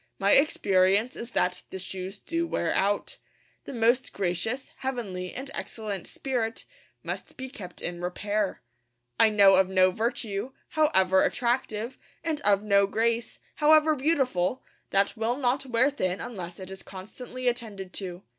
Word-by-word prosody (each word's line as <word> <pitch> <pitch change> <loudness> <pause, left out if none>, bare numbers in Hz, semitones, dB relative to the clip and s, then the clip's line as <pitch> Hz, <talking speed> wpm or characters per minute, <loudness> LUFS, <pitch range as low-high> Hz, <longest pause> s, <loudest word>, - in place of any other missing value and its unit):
My 200 +1 +2
experience 200 -5 +4
is 235 - -6
that 180 0 +1
the - - -6
shoes 190 +1 -5
do 335 +8 -2
wear 170 - 0
out. 200 +1 0 0.5
The - - -7
most 240 +2 +2
'gracious, 200 +7 -2
heavenly, 200 -9 -4
and 270 +2 -6
excellent 210 -5 -5
spirit' 245 -4 -3 0.4
must - - -6
be 260 0 -6
kept 180 -9 -9
in 175 0 -4
repair. 205 +2 -2 0.6
I 220 - +7
know 200 -3 +6
of 190 -1 +4
no 185 -1 +4
virtue, 220 +2 -2 0.2
however 190 -12 +3
attractive, 235 -1 -1 0.2
and 315 -3 -2
of 205 -4 +3
no 200 -1 +4
grace, 230 +2 0 0.2
however 310 +1 +5
beautiful, 260 - +1 0.3
that 195 +3 +2
will 225 +2 0
not 270 0 0
wear 250 +3 +3
thin 185 -9 -1
unless 180 -7 -6
it 190 0 -8
is 190 0 -8
constantly 250 +6 -7
attended 215 -6 -3
to. 180 -1 -5
215 Hz, 145 wpm, -27 LUFS, 190-255 Hz, 0.6 s, I